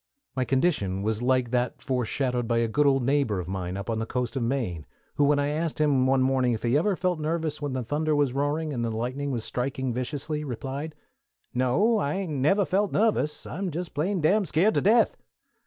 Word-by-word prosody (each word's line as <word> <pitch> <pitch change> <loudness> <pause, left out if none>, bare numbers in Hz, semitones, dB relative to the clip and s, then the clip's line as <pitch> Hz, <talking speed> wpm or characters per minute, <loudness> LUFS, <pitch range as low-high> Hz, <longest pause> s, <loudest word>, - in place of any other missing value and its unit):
My 130 -1 0
condition 125 - 0
was 110 +1 -1
like 125 -1 +1
that 125 0 0
foreshadowed 125 -1 -1
by 115 0 +1
a 115 0 +2
good 145 +6 +2
old 135 -2 +3
neighbor 135 -6 +1
of 90 - -5
mine 95 -1 -4
up 100 - -6
on 115 -1 -1
the 115 - -3
coast 125 0 -2
of 135 - -1
Maine, 115 - -2 0.3
who 145 - +1
when 145 0 +3
I 145 0 +1
asked 155 +1 -2
him 140 -4 +3
one 130 0 +3
morning 130 -2 +2
if 110 - -4
he 120 +2 +2
ever 190 +7 +2
felt 180 -2 -1
nervous 155 -1 -2
when 145 -2 -2
the 130 -1 -2
thunder 150 +5 0
was 145 -4 +2
roaring, 145 +3 -1
and 120 -3 -2
the 115 - 0
lightning 125 +6 -3
was 120 -5 -3
striking 130 0 -2
viciously, 145 +4 -3
replied, 140 +3 -5 0.6
"No, 160 - +2
I 145 -5 -1
hain't 190 -4 -3
never 155 +9 +2
felt 200 +3 +1
nervous: 205 -9 +1
_I'm 190 +4 -3
jest 170 +1 -5
plain 175 +6 0
dam 200 +7 +3
skeert 185 +5 +2
to - - +2
death! 225 +4 +4
140 Hz, 215 wpm, -26 LUFS, 125-155 Hz, 0.6 s, death